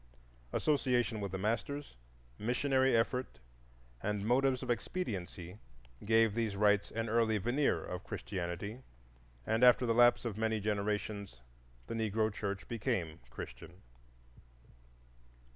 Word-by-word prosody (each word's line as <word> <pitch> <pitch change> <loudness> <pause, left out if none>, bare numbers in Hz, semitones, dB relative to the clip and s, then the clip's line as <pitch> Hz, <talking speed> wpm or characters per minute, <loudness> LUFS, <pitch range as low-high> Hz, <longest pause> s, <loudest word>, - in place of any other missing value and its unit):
Association 125 -7 +1
with 100 -2 -3
the 95 - -2
masters, 115 - -2 0.4
missionary 130 +2 +2
effort 125 - -1 0.6
and 105 0 -2
motives 130 +2 +2
of - - -1
expediency 100 - -4 0.5
gave 110 0 +4
these 110 -3 -1
rites 105 0 +3
an 115 0 -3
early 110 -1 +2
veneer 120 +8 +1
of 90 0 -5
Christianity, 95 +2 -4 0.7
and 110 +2 +1
after 125 0 +7
the 115 - +2
lapse 120 +1 +5
of 110 -2 -3
many 110 0 +1
generations 105 -4 -2 0.4
the - - -5
Negro 110 -1 0
church 100 -1 -4
became 90 -8 -2
Christian. - - -9
110 Hz, 115 wpm, -34 LUFS, 100-120 Hz, 0.7 s, after